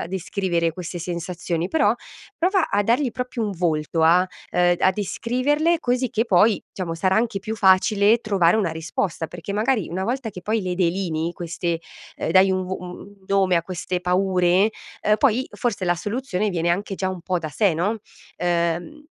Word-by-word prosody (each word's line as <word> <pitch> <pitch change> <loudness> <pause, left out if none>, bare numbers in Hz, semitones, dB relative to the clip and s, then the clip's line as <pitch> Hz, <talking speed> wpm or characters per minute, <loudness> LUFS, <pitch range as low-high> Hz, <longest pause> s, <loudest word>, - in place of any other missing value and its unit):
a - - -3
descrivere 180 -2 -1
queste 175 0 -6
sensazioni, 175 0 -3
però 230 -8 +3 0.4
prova 365 0 +2
a 205 - +2
dargli 240 +4 +1
proprio 250 -1 -3
un 205 - -2
volto 165 -2 0
a, 175 +3 +5 0.2
ehm, 175 0 +3
d - - -11
a 190 - +6
descriverle 260 - 0
così 250 0 0
che 225 +2 +1
poi 205 0 +3
diciamo 175 -3 -4
sarà 185 +4 +1
anche 225 -3 +1
più 220 +2 -5
facile 200 +3 +4
trovare 200 -4 +2
una 190 -7 +1
risposta. 160 +1 -3
Perché 175 +3 -7
magari 215 -1 0
una 185 +3 -3
volta 245 -1 -2
che 180 - -10
poi 220 +1 0
le 180 -1 -2
delinei 170 -2 -1
queste, 170 -1 -3 0.4
ehm, - - -2
dai 190 +1 +6
un 185 0 0
v - - -9
u - - -1
u - - -8 0.2
un 200 -1 -17
nome 190 -2 +3
a 170 - +1
queste 180 0 -4
paure, 180 +2 +2 0.3
ehm, 210 0 +3
poi 260 -1 +2
forse 205 -6 -2
la 175 0 +2
soluzione 210 +1 -2
viene 170 -2 -1
anche 195 +3 -1
già 190 - -1
un 185 -2 -5
po' 180 -1 -1
da 155 -2 -5
sé, 190 +2 +1
no? 205 +7 -1 0.4
Ehm 175 - -1
190 Hz, 190 wpm, -23 LUFS, 175-215 Hz, 0.4 s, a